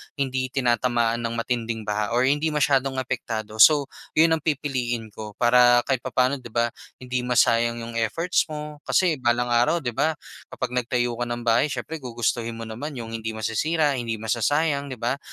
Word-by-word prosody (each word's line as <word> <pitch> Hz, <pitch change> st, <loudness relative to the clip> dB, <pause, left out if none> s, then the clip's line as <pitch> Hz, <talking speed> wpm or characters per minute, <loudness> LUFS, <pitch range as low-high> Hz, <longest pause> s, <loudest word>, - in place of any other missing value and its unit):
hindi 130 Hz, -2 st, -1 dB
tinatamaan 120 Hz, -2 st, +1 dB
ng 115 Hz, 0 st, -3 dB
matinding 115 Hz, -1 st, -2 dB
baha 105 Hz, +1 st, -2 dB
or 125 Hz, -, +3 dB
hindi 145 Hz, +4 st, +2 dB
masyadong 140 Hz, -3 st, +1 dB
apektado. 110 Hz, -4 st, -4 dB
So, 145 Hz, +2 st, +6 dB, 0.2 s
yun 160 Hz, +1 st, +5 dB
ang 160 Hz, -, +2 dB
pipiliin 130 Hz, -7 st, -2 dB
ko. 105 Hz, 0 st, -9 dB
Para 120 Hz, 0 st, +5 dB
kahit 135 Hz, -2 st, 0 dB
papano 130 Hz, +2 st, 0 dB
'di 125 Hz, -, -10 dB
ba, 120 Hz, +1 st, 0 dB, 0.2 s
hindi 125 Hz, 0 st, -3 dB
masayang 115 Hz, -1 st, +2 dB
yung 115 Hz, 0 st, -4 dB
efforts 165 Hz, +11 st, 0 dB
mo. 150 Hz, -1 st, -7 dB
Kasi, 170 Hz, -6 st, +2 dB
balang 120 Hz, 0 st, +1 dB
araw 120 Hz, +8 st, +2 dB
'di 120 Hz, -, -1 dB
ba, 155 Hz, +6 st, 0 dB, 0.3 s
kapag -, -, -4 dB
nagtayo 120 Hz, -1 st, -1 dB
ka 120 Hz, -, -1 dB
ng 120 Hz, 0 st, -4 dB
bahay 115 Hz, +4 st, +3 dB
siyempre 150 Hz, +4 st, -5 dB
gugustuhin 115 Hz, -2 st, -2 dB
mo 115 Hz, -, -7 dB
naman 120 Hz, +7 st, -6 dB
yung 115 Hz, -2 st, -6 dB
hindi 110 Hz, -1 st, -4 dB
masisira, 145 Hz, +6 st, 0 dB
hindi 115 Hz, -2 st, -3 dB
masasayang, 140 Hz, +7 st, 0 dB
'di 130 Hz, -, -6 dB
ba. 120 Hz, +3 st, -2 dB
120 Hz, 175 wpm, -24 LUFS, 115-140 Hz, 0.3 s, So